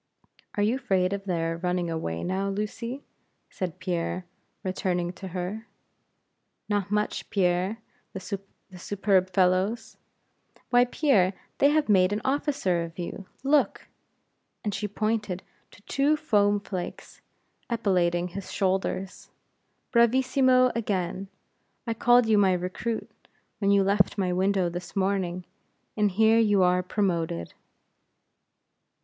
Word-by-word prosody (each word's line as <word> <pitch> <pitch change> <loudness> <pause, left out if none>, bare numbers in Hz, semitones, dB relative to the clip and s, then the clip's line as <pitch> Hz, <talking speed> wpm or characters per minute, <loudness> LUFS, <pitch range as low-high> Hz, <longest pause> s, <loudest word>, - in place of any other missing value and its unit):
"Are 205 - +1
you 225 +5 +2
afraid 195 -7 +1
of 200 0 -4
their 165 -3 -1
running 180 0 -1
away 85 - -3
now, 190 +2 -1
Lucy?" 230 +6 -4 0.5
said 180 -2 -4
Pierre, 180 0 -2 0.4
returning 180 -2 -1
to 190 - -8
her. 185 +5 -5 1.0
"Not 205 -2 -1
much, 210 0 -1
Pierre; 185 +2 +1 0.4
the 190 - -5 0.6
superb 190 -1 +1
fellows! 185 +5 +1 0.7
Why, 245 0 +6
Pierre, 230 - +2 0.3
they 280 - +6
have 305 0 +2
made 190 -3 +4
an 210 +1 -1
officer 270 - 0
of 165 0 -9
you 180 +2 -6 0.2
look!" 285 +1 +1 0.7
and 210 - -2
she 200 +1 -2
pointed 210 -2 -2 0.3
to 205 - -19
two 285 +6 +2
foam 205 -8 +2
flakes 185 -3 -7 0.5
epauletting 180 -6 +1
his 195 +1 -7
shoulders. 190 0 -2 0.6
"Bravissimo 255 +1 +4
again! 195 -4 -2 0.6
I 230 - -1
called 240 +1 +4
you 220 -2 +4
my 190 -2 +4
recruit, 185 +6 -3 0.5
when 200 - +1
you 200 -1 +5
left 195 +1 +2
my 185 -2 0
window 190 0 +2
this 175 +3 -6
morning, 190 -2 -1 0.5
and 210 -1 +2
here 220 +4 +4
you 205 -4 +4
are 180 0 +3
promoted." 170 - -1
195 Hz, 120 wpm, -27 LUFS, 180-220 Hz, 1.0 s, Why